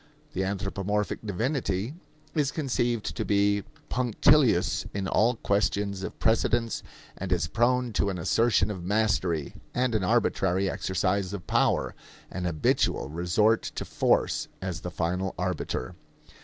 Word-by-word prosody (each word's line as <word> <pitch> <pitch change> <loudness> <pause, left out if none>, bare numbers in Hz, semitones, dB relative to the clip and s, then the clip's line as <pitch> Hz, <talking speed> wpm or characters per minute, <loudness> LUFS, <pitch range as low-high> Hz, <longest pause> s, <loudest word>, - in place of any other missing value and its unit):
The 95 - -1
anthropomorphic 100 +1 -2
divinity 110 - -1 0.4
is 150 -4 +1
conceived 120 -7 -1
to - - -1
be 100 0 +2 0.3
punctilious 125 -3 +3
in 100 -1 -1
all 115 +5 +3
questions 100 -2 0
of - - -6
precedence 115 +1 +1 0.4
and 95 0 -4
is 90 -3 +2
prone 120 +6 +1
to 100 - +1
an 95 - -3
assertion 105 +3 +2
of 95 -4 -6
mastery 95 -6 0 0.2
and 125 -1 +1
an 110 -3 +1
arbitrary 95 +1 +2
exercise 95 +1 -1
of 95 -5 -6
power - - +1 0.4
an 90 0 -4
habitual 80 -4 +1
resort 90 +8 +2
to - - -3
force - - +1
as 95 -3 -4
the 90 - -4
final 90 +2 -2
arbiter. 90 -8 -2
100 Hz, 130 wpm, -27 LUFS, 90-115 Hz, 0.4 s, punctilious